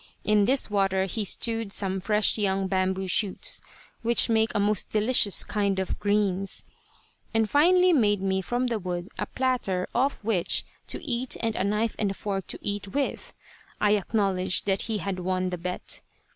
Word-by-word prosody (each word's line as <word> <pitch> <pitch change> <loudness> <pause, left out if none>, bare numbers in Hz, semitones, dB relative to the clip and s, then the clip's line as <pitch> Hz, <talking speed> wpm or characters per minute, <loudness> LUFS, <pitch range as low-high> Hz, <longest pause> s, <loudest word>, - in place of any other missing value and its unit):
In 210 -1 +3
this 260 -2 +2
water 195 -2 +1
he 210 +3 -3
stewed 225 +1 +1
some 195 -1 0
fresh 210 +2 +2
young 195 -2 0
bamboo 190 0 0
shoots, 195 +1 0 0.4
which 235 +1 +3
make 220 0 +3
a - - +2
most 205 0 +1
delicious 215 -1 +3
kind 200 -2 -1
of 190 -1 -2
"greens," 200 -2 0 0.7
and 225 -1 +3
finally 360 +7 +4
made 210 - +3
me 190 0 0
from 245 +7 -1
the 235 -3 -1
wood 180 0 -4
a - - -2
platter 245 -9 -1
off 265 -1 0
which 200 -5 +1 0.2
to - - -4
eat 250 -2 -1
and 225 -1 -1
a - - 0
knife 210 +3 0
and 200 -2 -1
fork 195 -2 -3
to - - -2
eat 205 -1 -3
with. 275 +7 -3 0.5
I 210 - +3
acknowledged 195 -3 +1
that 195 -1 +1
he 220 - 0
had 195 -2 -3
won 185 0 -1
the 180 - -4
bet. 180 +1 -4
205 Hz, 170 wpm, -26 LUFS, 190-225 Hz, 0.7 s, finally